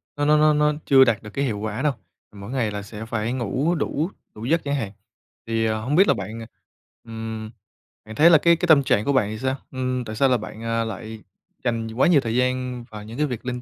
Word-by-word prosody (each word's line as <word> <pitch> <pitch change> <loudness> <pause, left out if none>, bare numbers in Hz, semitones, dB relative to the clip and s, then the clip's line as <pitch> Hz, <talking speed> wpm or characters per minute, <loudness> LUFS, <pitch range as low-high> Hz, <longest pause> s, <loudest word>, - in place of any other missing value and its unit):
nó 145 0 -1
nó 150 0 +5
nó 155 0 +5
nó 150 0 +2
chưa 135 -1 +7
đạt 115 -4 +1
được 105 - -8
cái 140 +6 -2
hiệu 105 -5 -2
quả 110 +3 -3
đâu. 150 -3 +1 0.4
Mỗi 100 +3 -9
ngày 120 -6 0
là 105 0 -4
sẽ 105 +2 -8
phải 115 +1 -2
ngủ 130 - 0
đủ 155 +2 -1 0.3
đủ 110 +2 -7
giấc 165 +5 +1
chẳng 140 0 -1
hạn. 110 -8 -3 0.6
Thì, 115 0 0
à, 110 0 +1
hông 125 +7 -2
biết 195 +3 +6
là - - +5
bạn, 110 +3 -6
à, 115 - -8 0.6
ừm, 110 -1 -6 0.6
bạn 110 0 -9
thấy 160 +6 +7
là 165 - +8
cái 170 +3 +4
cái 175 +2 -2
tâm 145 -4 +6
trạng 105 -4 +1
của 140 - +1
bạn 105 -6 +2
thì 110 0 -6
sao? 130 0 -1 0.2
Ừm, 130 -1 -2
tại 110 - -6
sao 135 +3 +3
là 125 - +3
bạn, 110 +1 -9
à, 115 0 0
lại 110 0 -7 0.4
dành 115 -2 -1
quá 130 - +3
nhiều 155 -6 +5
thời 115 0 -3
gian 125 -1 -1
vào 105 -1 -8
những 115 +4 -9
cái 150 0 +1
việc 125 -1 -6
linh 125 -1 -3
120 Hz, 255 wpm, -23 LUFS, 110-140 Hz, 0.6 s, là